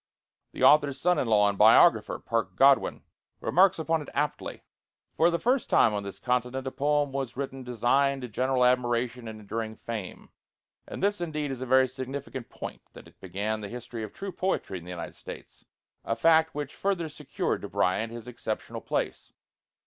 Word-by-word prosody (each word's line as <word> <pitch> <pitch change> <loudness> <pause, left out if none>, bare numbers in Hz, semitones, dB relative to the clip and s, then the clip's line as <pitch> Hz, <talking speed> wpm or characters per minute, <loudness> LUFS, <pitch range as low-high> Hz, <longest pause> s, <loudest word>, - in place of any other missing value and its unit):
The - - -4
author's 145 -2 +5
son 180 +1 +2
in - - 0
law 105 -2 +4
and 100 -1 -2
biographer, - - +6
Parke 115 -6 -2
Godwin, 135 +4 +4 0.4
remarks 190 +2 +4
upon 160 0 0
it 150 - -9
aptly, 145 0 -2 0.5
"For 165 +2 +4
the 170 - 0
first 250 +7 +1
time 110 - +4
on 105 - -1
this 100 -2 -7
continent 125 +1 -1
a 130 - -3
poem 145 0 +1
was 135 -3 -4
written 135 -1 -4
destined 130 +3 +1
to - - -4
general 125 +2 +1
admiration 120 -1 +1
and 110 -1 -7
enduring 110 +1 -4
fame;" 110 -6 -7 0.6
and - - -7
this 205 -2 +1
indeed 150 -4 -2
is 130 -1 -6
a 130 - -4
very 130 +1 +5
significant 130 0 -6
point, - - -8
that - - -13
it - - -21
began 105 +4 -3
the 100 - -6
history 120 0 -7
of 110 -2 -6
true 195 0 -6
poetry 180 - -2
in 85 - -14
the - - -10
United 85 -2 -6
States, - - -11 0.4
a 115 - -1
fact 160 +5 +4
which 145 -2 -4
further 190 -4 -1
secured 150 -2 -3
to - - -7
Bryant 110 +5 0
his 120 0 -9
exceptional 115 -3 -5
place. - - -3
130 Hz, 185 wpm, -28 LUFS, 115-145 Hz, 0.6 s, biographer